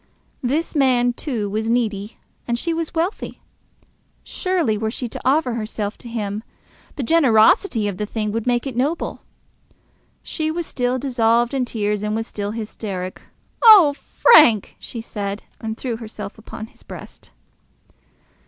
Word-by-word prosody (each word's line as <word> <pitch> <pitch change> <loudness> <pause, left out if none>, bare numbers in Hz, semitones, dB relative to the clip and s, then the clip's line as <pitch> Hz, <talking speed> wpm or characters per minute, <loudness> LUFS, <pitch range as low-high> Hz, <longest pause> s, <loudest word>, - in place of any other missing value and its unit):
This 295 +7 -1
man, 250 -3 +3
too, 240 -6 -3
was 215 +2 -2
needy, 215 -3 -1 0.3
and 235 -1 0
she 335 +7 -1
was 330 +1 -3
wealthy. 340 +5 -2 0.8
Surely, 360 - 0
were 220 +1 -1
she 245 +2 -4
to - - -8
offer 265 -1 +2
herself 215 -2 -3
to 240 - -10
him, 210 -2 -3 0.5
the 275 - -3
generosity 235 - +4
of 200 -3 -3
the 210 - -3
thing 210 -1 -2
would 225 +2 -3
make 240 0 +1
it 265 -3 -4
noble. 290 +7 -1 1.0
She 315 -2 -2
was 335 +1 -2
still 250 -2 -1
dissolved 240 -2 +2
in 265 -2 +1
tears 210 -3 -1
and 210 0 -1
was 225 0 -2
still 205 -2 -4
hysteric. 210 -4 -5 0.4
"Oh, 405 -11 +9
Frank!" 290 - +5
she 230 - -7
said, 205 -2 -5 0.2
and 220 0 -4
threw 240 -3 -3
herself 215 -2 -8
upon 220 0 -8
his - - -19
breast. - - -11
235 Hz, 150 wpm, -21 LUFS, 215-275 Hz, 1.0 s, Oh